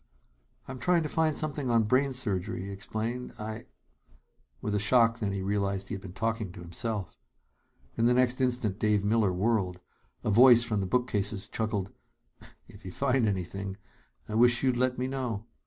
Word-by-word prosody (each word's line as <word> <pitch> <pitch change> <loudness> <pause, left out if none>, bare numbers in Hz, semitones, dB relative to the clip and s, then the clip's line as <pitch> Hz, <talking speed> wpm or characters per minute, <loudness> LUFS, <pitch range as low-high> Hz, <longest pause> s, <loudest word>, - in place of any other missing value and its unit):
"I'm 130 -1 -7
trying 175 +1 +2
to 150 - -3
find 160 -1 +1
something 145 -4 -2
on 115 -1 +3
brain 130 +5 +2
surgery," 110 -4 -2
he 100 - -6
explained. 110 +5 -4
"I 110 +1 -7 0.5
" - - -37
With 105 - -2
a 105 - +1
shock, 115 +1 +3
then, 105 -3 -1
he 100 -1 -3
realized 100 0 -1
he - - -4
had 100 - -5
been 95 -2 -9
talking 110 -1 -2
to - - -11
himself. 95 +2 -4 0.8
In 115 0 +2
the 125 - +3
next 125 +1 +2
instant, 120 -6 0
Dave 105 -2 +1
Miller 105 -2 +2
whirled. 95 -1 0 0.4
A 110 - 0
voice 120 +2 +7
from 110 -3 0
the 95 - -2
bookcases 105 -3 +1
chuckled: 105 -4 -3 0.8
"If - - -15
you 95 - -7
find 130 0 +1
anything, 95 0 -3 0.5
I 105 - -6
wish 120 +3 +4
you'd 130 -2 +2
let 125 +1 0
me 125 - -1
know. 125 -5 -3
110 Hz, 180 wpm, -29 LUFS, 100-125 Hz, 0.8 s, voice